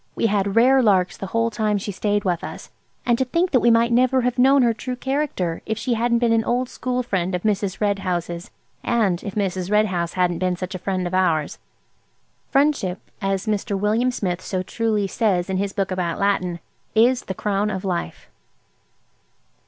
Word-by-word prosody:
We -, -, 0 dB
had 200 Hz, -2 st, +1 dB
rare 260 Hz, +3 st, +5 dB
larks 190 Hz, -6 st, +2 dB
the 195 Hz, -, -6 dB
whole 230 Hz, +3 st, 0 dB
time 210 Hz, -1 st, 0 dB
she 205 Hz, +1 st, -4 dB
stayed 205 Hz, +1 st, -1 dB
with 175 Hz, -4 st, -1 dB
us. -, -, -8 dB, 0.3 s
And 240 Hz, -2 st, +2 dB
to 260 Hz, -, +2 dB
think 335 Hz, +8 st, 0 dB
that 255 Hz, -, +4 dB
we 235 Hz, -, +3 dB
might 230 Hz, +1 st, +4 dB
never 255 Hz, +2 st, +3 dB
have 250 Hz, 0 st, -1 dB
known 270 Hz, +1 st, +5 dB
her 235 Hz, -1 st, +3 dB
true 250 Hz, +3 st, -5 dB
character 265 Hz, -, -2 dB
if 220 Hz, -, -1 dB
she 235 Hz, +2 st, -1 dB
hadn't 235 Hz, +1 st, +1 dB
been 235 Hz, -1 st, +2 dB
an 225 Hz, 0 st, +2 dB
old 245 Hz, +2 st, 0 dB
school 250 Hz, 0 st, -2 dB
friend 185 Hz, -5 st, -1 dB
of 180 Hz, -, -4 dB
Mrs. 200 Hz, -2 st, -1 dB
Red 205 Hz, -2 st, +1 dB
House's, 175 Hz, -2 st, -3 dB, 0.3 s
and 205 Hz, -7 st, +1 dB
if 200 Hz, 0 st, -6 dB
Mrs. 190 Hz, -3 st, -1 dB
Red 210 Hz, +1 st, +4 dB
House 175 Hz, -4 st, -2 dB
hadn't 180 Hz, -2 st, +1 dB
been 185 Hz, -1 st, 0 dB
such 185 Hz, +1 st, -6 dB
a 185 Hz, -, -5 dB
friend 185 Hz, 0 st, -2 dB
of 175 Hz, -, -4 dB
ours! 165 Hz, -5 st, +1 dB, 0.9 s
"Friendship," 275 Hz, -10 st, +1 dB, 0.2 s
as 195 Hz, 0 st, -1 dB
Mr. 210 Hz, -1 st, -1 dB
William 220 Hz, +5 st, +2 dB
Smith 185 Hz, -7 st, -2 dB
so 185 Hz, 0 st, -3 dB
truly 215 Hz, 0 st, -1 dB
says 190 Hz, -3 st, 0 dB
in 190 Hz, -, 0 dB
his 200 Hz, +1 st, -1 dB
book 195 Hz, -2 st, -2 dB
about 180 Hz, -2 st, -2 dB
Latin, 185 Hz, -3 st, 0 dB, 0.4 s
"is 245 Hz, +3 st, +3 dB
the 190 Hz, -, -4 dB
crown 205 Hz, +1 st, 0 dB
of 190 Hz, -2 st, -4 dB
life." 180 Hz, -3 st, -3 dB
205 Hz, 200 wpm, -22 LUFS, 185-235 Hz, 0.9 s, rare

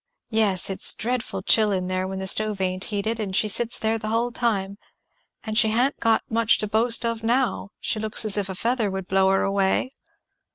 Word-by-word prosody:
"Yes 210 Hz, -5 st, +2 dB
it's 190 Hz, -, +3 dB
dreadful 245 Hz, +1 st, -4 dB
chill 215 Hz, -2 st, +4 dB
in 185 Hz, -2 st, -2 dB
there 185 Hz, 0 st, -2 dB
when 190 Hz, 0 st, -6 dB
the 190 Hz, -, -5 dB
stove 210 Hz, +2 st, +2 dB
ain't 185 Hz, 0 st, -2 dB
heated, 220 Hz, +2 st, -3 dB
and 195 Hz, -3 st, -4 dB
she 215 Hz, -, +2 dB
sits 235 Hz, +3 st, 0 dB
there 225 Hz, +1 st, -1 dB
the 215 Hz, -, -6 dB
hull 230 Hz, +2 st, -1 dB
time. 200 Hz, -5 st, -2 dB, 0.6 s
And 220 Hz, -1 st, -5 dB
she 220 Hz, -1 st, +4 dB
ha'n't 245 Hz, +6 st, 0 dB
'got 225 Hz, -1 st, +2 dB
much 230 Hz, 0 st, +2 dB
to 210 Hz, -, -3 dB
boast 230 Hz, +3 st, +2 dB
of 230 Hz, -1 st, -2 dB
now: 240 Hz, -2 st, -1 dB
she 220 Hz, -, -2 dB
looks 220 Hz, +1 st, +1 dB
as 210 Hz, -, +3 dB
if 200 Hz, -2 st, -1 dB
a 190 Hz, -, -5 dB
feather 230 Hz, +1 st, -1 dB
would 190 Hz, -1 st, -6 dB
blow 190 Hz, 0 st, +2 dB
her 195 Hz, 0 st, +1 dB
away." 195 Hz, +5 st, 0 dB
215 Hz, 210 wpm, -23 LUFS, 195-230 Hz, 0.6 s, chill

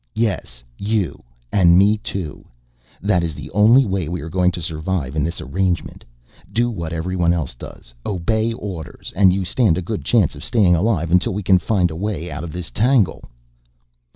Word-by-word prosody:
"Yes, 100 Hz, -, -2 dB, 0.2 s
you 100 Hz, -6 st, -1 dB, 0.3 s
and 90 Hz, -3 st, +5 dB
me, 100 Hz, +3 st, +5 dB
too. 90 Hz, -7 st, -6 dB, 0.6 s
That 100 Hz, -3 st, +2 dB
is 80 Hz, -3 st, -3 dB
the -, -, -9 dB
only 115 Hz, +7 st, +5 dB
way 95 Hz, -6 st, -2 dB
we 90 Hz, 0 st, -3 dB
are 80 Hz, -, -7 dB
going 90 Hz, 0 st, +3 dB
to -, -, -4 dB
survive 80 Hz, -3 st, -3 dB
in 75 Hz, -, +1 dB
this 85 Hz, +3 st, -3 dB
arrangement. 90 Hz, +3 st, -2 dB, 0.5 s
Do 120 Hz, +1 st, +1 dB
what 85 Hz, -7 st, -5 dB
everyone 85 Hz, +1 st, 0 dB
else 80 Hz, -8 st, -2 dB
does, -, -, -12 dB
obey 110 Hz, +4 st, 0 dB
orders, 90 Hz, -, -7 dB
and 95 Hz, -1 st, +5 dB
you 95 Hz, 0 st, -1 dB
stand 100 Hz, -4 st, +2 dB
a -, -, -1 dB
good 105 Hz, +4 st, -4 dB
chance 105 Hz, -10 st, +2 dB
of 75 Hz, -, -10 dB
staying 100 Hz, -8 st, +3 dB
alive 85 Hz, -3 st, 0 dB
until 90 Hz, +1 st, +2 dB
we 105 Hz, -, -3 dB
can 95 Hz, 0 st, +4 dB
find 90 Hz, -3 st, +1 dB
a -, -, -6 dB
way 90 Hz, -2 st, -3 dB
out 75 Hz, +2 st, -5 dB
of 85 Hz, -, -6 dB
this 90 Hz, 0 st, -6 dB
tangle." 120 Hz, -3 st, +2 dB
90 Hz, 185 wpm, -20 LUFS, 80-105 Hz, 0.6 s, and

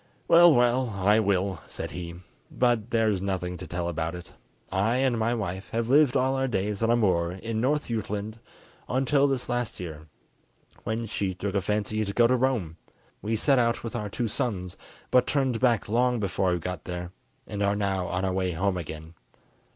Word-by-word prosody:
"Well, 170 Hz, 0 st, +8 dB
well, 125 Hz, -1 st, +3 dB
I 105 Hz, +3 st, +4 dB
will," 95 Hz, -3 st, 0 dB
said -, -, -6 dB
he, 85 Hz, 0 st, -6 dB, 0.3 s
"but 120 Hz, -3 st, +1 dB
there 115 Hz, -1 st, +2 dB
is 100 Hz, -4 st, +1 dB
nothing 90 Hz, -2 st, -2 dB
to 90 Hz, -, -8 dB
tell 90 Hz, -1 st, -3 dB
about 85 Hz, 0 st, -2 dB
it. 90 Hz, 0 st, -10 dB, 0.4 s
I 105 Hz, +5 st, +1 dB
and 130 Hz, -2 st, +2 dB
my 115 Hz, +2 st, +1 dB
wife 95 Hz, -3 st, -4 dB
have 115 Hz, 0 st, -1 dB
lived 140 Hz, -1 st, +5 dB
all 130 Hz, +1 st, +1 dB
our 135 Hz, 0 st, 0 dB
days 105 Hz, -2 st, -2 dB
on 115 Hz, -, +2 dB
a 120 Hz, -, +5 dB
moor 90 Hz, -6 st, +1 dB
in 110 Hz, +4 st, -3 dB
North 145 Hz, +4 st, +1 dB
Jutland, 110 Hz, -1 st, -4 dB, 0.5 s
until 135 Hz, +2 st, +3 dB
this 135 Hz, -3 st, -1 dB
last 120 Hz, -2 st, -2 dB
year, 80 Hz, -3 st, -7 dB, 0.8 s
when 115 Hz, +1 st, -2 dB
she 100 Hz, -3 st, -2 dB
took 100 Hz, +1 st, -3 dB
a 100 Hz, -, +1 dB
fancy 105 Hz, +2 st, -1 dB
to 100 Hz, -1 st, -4 dB
go 120 Hz, -, +4 dB
to 125 Hz, +2 st, +4 dB
Rome. 120 Hz, -11 st, 0 dB, 0.4 s
We 110 Hz, +3 st, -1 dB
set 135 Hz, +4 st, +3 dB
out 115 Hz, -1 st, +1 dB
with 115 Hz, +1 st, -5 dB
our 105 Hz, -3 st, -3 dB
two 115 Hz, +3 st, -2 dB
sons 95 Hz, -5 st, -3 dB, 0.4 s
but 125 Hz, -1 st, +4 dB
turned 130 Hz, -5 st, +1 dB
back 120 Hz, -4 st, +2 dB
long 120 Hz, +2 st, +2 dB
before 95 Hz, -2 st, 0 dB
we 90 Hz, -, +1 dB
got 90 Hz, -1 st, -5 dB
there, 90 Hz, 0 st, -5 dB, 0.3 s
and 105 Hz, -, -5 dB
are 100 Hz, 0 st, +2 dB
now 95 Hz, -3 st, -1 dB
on 90 Hz, +1 st, -1 dB
our 95 Hz, -, 0 dB
way 95 Hz, -1 st, 0 dB
home 95 Hz, +3 st, 0 dB
again. 80 Hz, -1 st, -7 dB
105 Hz, 195 wpm, -27 LUFS, 95-120 Hz, 0.8 s, Well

